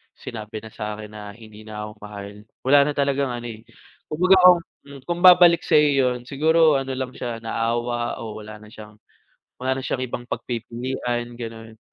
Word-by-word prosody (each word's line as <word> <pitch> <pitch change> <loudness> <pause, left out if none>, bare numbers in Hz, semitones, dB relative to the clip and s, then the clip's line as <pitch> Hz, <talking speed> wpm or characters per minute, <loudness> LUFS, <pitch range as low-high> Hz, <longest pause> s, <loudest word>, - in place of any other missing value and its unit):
sinabi 110 -1 -8
na 110 - -10
sa'kin 105 0 -6
na 105 -1 -9
hindi 110 -2 -14
na 105 -1 -6
ako 105 0 -13
mahal, 100 -1 -8 0.3
wala 140 +3 +6
na 150 - -1
talagang 140 -1 +1
ano 120 -1 -6
eh, 110 -1 -9 0.4
kumbaga, 185 +5 +4 0.5
hmm, 140 -1 -11
kung 175 0 -2
babalik 175 -2 +8
sa'yo 150 0 +4
'yun 130 -3 +1
siguro 155 +1 +3
ano 135 0 -4
lang 130 -1 -4
siya, 120 -2 -5
naawa 120 +1 -1
o 110 -1 -7
wala 105 0 -10
na 105 - -14
siyang, 105 -1 -12 0.6
wala 130 +1 -1
na - - -7
siyang 130 - -2
ibang 120 -1 -5
pagpipilian, 120 0 -4
gano'n. 115 -1 -8
120 Hz, 170 wpm, -23 LUFS, 110-135 Hz, 0.6 s, babalik